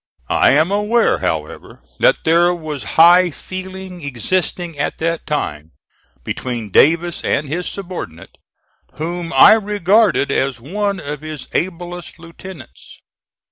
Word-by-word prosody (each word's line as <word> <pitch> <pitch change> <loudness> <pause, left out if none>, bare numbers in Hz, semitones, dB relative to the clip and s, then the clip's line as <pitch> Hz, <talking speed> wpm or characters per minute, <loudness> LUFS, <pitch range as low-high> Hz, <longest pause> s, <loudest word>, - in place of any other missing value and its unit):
I - - +4
am 155 +6 +3
aware, 210 +3 +2
however, - - -5 0.2
that - - +3
there 175 +2 +3
was 155 -4 -6
high 175 +2 +7
feeling 185 +2 -8
existing 165 - -2
at 145 - -2
that 165 0 -2
time 80 - -3 0.5
between 120 -5 -5
Davis 165 - +3
and 140 +1 0
his 170 +5 -3
subordinate, 175 - -8 0.5
whom 170 +2 -5
I - - +8
regarded 205 -6 +2
as 135 -2 -1
one 200 - -2
of 145 0 -6
his 155 -3 -8
ablest 175 -1 -4
lieutenants. 170 -2 -12
170 Hz, 120 wpm, -18 LUFS, 150-185 Hz, 0.5 s, I